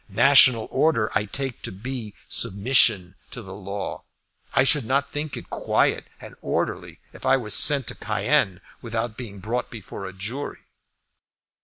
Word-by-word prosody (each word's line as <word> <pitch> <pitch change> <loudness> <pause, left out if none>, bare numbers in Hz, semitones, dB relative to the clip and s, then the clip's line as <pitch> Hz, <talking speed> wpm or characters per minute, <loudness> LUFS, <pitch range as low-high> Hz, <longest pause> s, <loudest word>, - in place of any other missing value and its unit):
National 120 +1 +6
order 115 -9 +2
I 105 - +1
take 130 +4 -3
to - - -4
be 110 +2 -6
submission 100 -3 +2 0.2
to 120 - -8
the 95 -1 -10
law. 100 0 -6 0.5
I 135 - +5
should 140 0 +3
not 135 +4 0
think 145 0 -4
it - - -11
quiet - - 0
and - - -11
orderly - - -3 0.2
if - - -14
I 135 - +4
were 110 -5 -4
sent 140 +1 +5
to - - -3
Cayenne 95 -1 0 0.2
without 115 0 -3
being 110 -5 -8
brought 110 +6 -3
before 105 -3 -8
a 95 - -9
jury." 110 +10 -5
115 Hz, 155 wpm, -24 LUFS, 100-135 Hz, 0.5 s, National